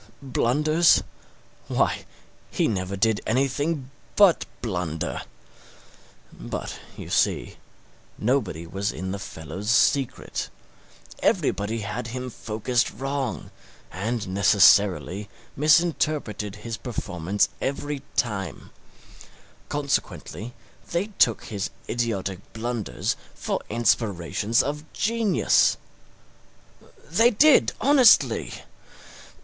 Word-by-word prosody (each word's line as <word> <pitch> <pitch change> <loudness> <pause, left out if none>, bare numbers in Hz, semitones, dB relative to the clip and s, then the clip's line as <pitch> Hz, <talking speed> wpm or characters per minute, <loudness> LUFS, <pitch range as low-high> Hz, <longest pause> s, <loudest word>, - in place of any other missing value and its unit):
Blunders? 150 +6 +3 0.6
why, - - 0 0.4
he - - +1
never 95 -2 -2
did 110 +2 +1
anything 135 +3 0 0.2
but 200 -5 +5 0.2
blunder. 90 -7 -3 1.1
But, - - -6 0.2
you - - -8
see, - - +1 0.6
nobody 105 - 0
was 95 +4 -2
in 95 +3 -5
the 100 - -4
fellow's 90 +2 -7
secret 130 +2 +1 0.7
everybody 110 +3 0
had 105 +4 -4
him 125 +2 -5
focused 115 +3 -1
wrong, 135 0 -4 0.4
and 110 +4 -3
necessarily 100 0 +4 0.3
misinterpreted 150 - +1
his 115 +2 -6
performance 100 -6 -1
every 140 +1 -3
time 105 -5 -2 1.0
consequently 140 -4 -3 0.3
they 175 +5 -1
took 115 - +4
his 105 -3 -4 0.2
idiotic 100 -6 -2
blunders 115 -1 -2 0.2
for - - -2
inspirations 105 -2 +1
of 150 +2 -3
genius; 210 - +2 1.3
they 225 +10 +4
did 275 +6 +5
honestly! 260 -2 +4
115 Hz, 85 wpm, -25 LUFS, 100-140 Hz, 1.3 s, but